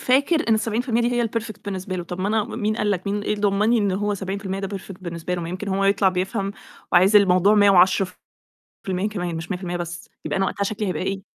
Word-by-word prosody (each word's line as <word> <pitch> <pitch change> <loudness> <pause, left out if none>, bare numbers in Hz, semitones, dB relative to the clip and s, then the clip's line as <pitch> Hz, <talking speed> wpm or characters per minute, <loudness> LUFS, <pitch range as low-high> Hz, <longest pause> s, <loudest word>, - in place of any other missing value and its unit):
فاكر 280 +3 +2
إن 225 - +5
ال70% 225 +2 0
دي 240 +1 +1
هي 240 -1 +1
الperfect 215 -2 -5
بالنسبة 190 -2 -4
له، 175 - -3
طَب 180 +2 -6
ما 195 - 0
أنا 220 -1 +1
م 235 - -7
مين 215 -1 0
قال 210 -2 0
لك 185 -1 -2
مين 205 +1 -1
إيه 210 - -1
ضمّننّي 210 +3 +2
إن 200 -2 +1
هو 205 +2 0
70% 195 0 -4
ده 195 0 -4
perfect 195 - -10
بالنسبة 170 0 -4
له، 175 - -3
ما 165 - -5
يمكن 185 +3 -5
هو 195 +1 0
يطلع 195 -1 +4
بيفهم 195 +2 -2 0.4
وعايز 190 +4 +6
الموضوع 195 0 +5
110% 190 0 +1
كمان 180 -5 -3
مش 160 +3 -6
100% 180 -1 -3
بس، 175 +5 -6 0.2
يبقى - - -1
أنا 195 - +2
وقتها 200 - -2
شكلي 210 0 -2
هيبقى 185 - -2
إيه؟ 195 0 -2
195 Hz, 225 wpm, -23 LUFS, 185-210 Hz, 0.4 s, وعايز